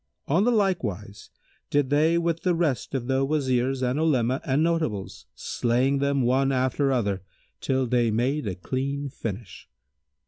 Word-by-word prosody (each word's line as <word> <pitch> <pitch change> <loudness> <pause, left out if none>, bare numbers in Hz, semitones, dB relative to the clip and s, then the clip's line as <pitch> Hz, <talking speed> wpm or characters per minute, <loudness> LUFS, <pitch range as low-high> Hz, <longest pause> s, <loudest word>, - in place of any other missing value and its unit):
On 165 +8 +3
like 205 - +2
wise 100 -1 -6 0.4
did 145 -2 +1
they 155 +3 +3
with 170 -1 0
the 180 -2 +1
rest 150 -6 -1
of 125 -3 -2
the 135 +1 +1
Wazirs 135 -2 0
and 125 +3 0
Olema 130 -5 +1
and 145 -1 +1
Notables, 155 - -2
slaying 125 +4 0
them, 140 -1 +1
one 135 +3 +2
after 130 +2 +1
other, 100 -7 0 0.4
till 130 -1 0
they 120 -1 +2
made 125 +4 0
a 95 - -2
clean 140 +8 -3
finish. 110 -6 -7
135 Hz, 150 wpm, -25 LUFS, 120-150 Hz, 0.4 s, On